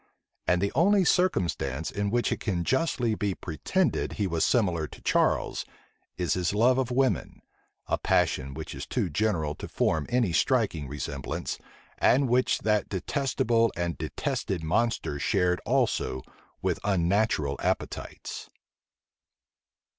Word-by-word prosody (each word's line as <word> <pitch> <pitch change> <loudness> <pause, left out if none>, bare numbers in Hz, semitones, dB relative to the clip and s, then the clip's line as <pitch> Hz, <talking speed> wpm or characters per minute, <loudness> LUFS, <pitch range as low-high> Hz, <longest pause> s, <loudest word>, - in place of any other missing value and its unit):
And 90 +1 +2
the 100 - +1
only 195 +2 +4
circumstance 85 - +1
in 100 0 -1
which 120 +3 +1
it - - -1
can 90 -6 -1
justly 130 - +1
be 100 -3 -1
pretended 160 - -1
he 105 - -1
was 85 -3 0
similar 90 - +2
to - - -13
Charles, - - +1 0.5
is 90 -2 0
his 90 +2 0
love 125 +4 +4
of 130 - 0
women, 130 +1 0 0.4
a - - -1
passion 70 +1 +1
which 80 0 -6
is - - -6
too 85 - -1
general 80 -4 0
to - - -8
form 80 -2 0
any 120 -8 +1
striking 100 - +1
resemblance, 70 -1 -4 0.4
and 135 +2 +4
which 125 +1 +2
that 105 -1 +1
detestable 115 - +1
and 85 -2 -1
detested 90 -4 -2
monster 100 -4 0
shared 90 +3 +1
also 65 - +1 0.4
with - - 0
unnatural 95 -5 +1
appetites. - - -3
100 Hz, 130 wpm, -27 LUFS, 80-120 Hz, 0.5 s, only